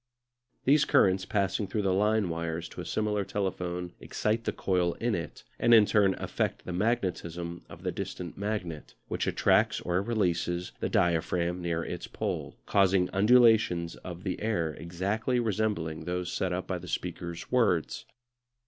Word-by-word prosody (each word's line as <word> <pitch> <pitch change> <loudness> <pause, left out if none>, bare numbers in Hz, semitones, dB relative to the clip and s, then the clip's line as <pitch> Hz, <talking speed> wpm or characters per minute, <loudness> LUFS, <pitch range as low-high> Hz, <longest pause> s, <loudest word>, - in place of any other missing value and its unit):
These 145 +3 +5
currents 95 -1 +3
passing 100 +1 0
through 105 +2 -1
the 95 -1 +2
line 105 +1 +2
wires 85 0 -3
to - - -7
a - - -7
similar 105 -1 0
telephone 90 -3 -3
excite 110 +2 -1
the - - +1
coil 90 -2 0
in 120 0 -1
it, 85 -5 -5 0.2
and 120 - +6
in 110 -2 +7
turn 100 -2 +3
affect - - -2
the 90 - -4
magnetism 90 -5 -2
of - - -12
the - - -1
distant 85 -3 -5
magnet, 95 -6 -4
which - - -1
attracts - - +3
or 90 +1 0
releases 90 -5 -1
the - - -1
diaphragm 85 +1 +1
near 85 -1 -1
its - - -5
pole, - - -4
causing 95 -2 +3
undulations 105 -5 +4
of 90 0 -8
the 95 - -3
air 85 -8 0
exactly 100 +10 -1
resembling 105 -8 -1
those 90 0 -2
set 95 - -1
up 90 +1 -2
by 90 -2 -3
the - - -10
speaker's 85 -1 -5
words. 110 -10 +1
95 Hz, 155 wpm, -29 LUFS, 85-105 Hz, 0.2 s, in